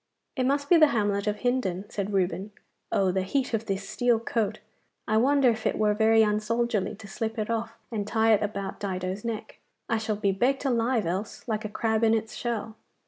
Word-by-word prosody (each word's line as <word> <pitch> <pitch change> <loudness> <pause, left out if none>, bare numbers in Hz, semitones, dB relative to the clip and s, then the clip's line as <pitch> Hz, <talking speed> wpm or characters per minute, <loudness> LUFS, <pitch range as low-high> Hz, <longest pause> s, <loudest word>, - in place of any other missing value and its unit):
'It 255 -3 +1
must 285 +1 +1
be 345 - +6
the 310 -1 +7
hamlet 205 -4 0
of 210 0 -1
Hindon,' 225 -7 0
said 205 -1 -3
Reuben. 195 +1 -1 0.4
'Oh, 190 -2 +2
the 190 +1 0
heat 255 +7 -1
of 225 0 -1
this 195 -1 -2
steel 230 +2 +2
coat! 225 -2 -1 0.5
I 215 - +2
wonder 265 +1 +4
if 220 -1 -2
it - - 0
were 210 -1 +3
very 220 +1 +5
un 210 0 +2
soldierly 230 -2 -1
to 210 0 -12
slip 220 +3 -4
it 215 +1 -2
off 225 0 -3
and 210 -3 -3
tie 225 0 +3
it 210 - +3
about 200 -2 -3
Dido's 185 0 -3
neck. 230 -2 -5 0.3
I 225 - +1
shall 220 -1 -1
be 200 -1 +1
baked 260 +8 0
alive 235 -3 +1
else, 190 +9 -4
like 215 -1 -2
a - - -3
crab 220 +1 0
in 225 0 +5
its 220 0 -3
shell. 225 -2 -4
220 Hz, 210 wpm, -27 LUFS, 205-235 Hz, 0.5 s, the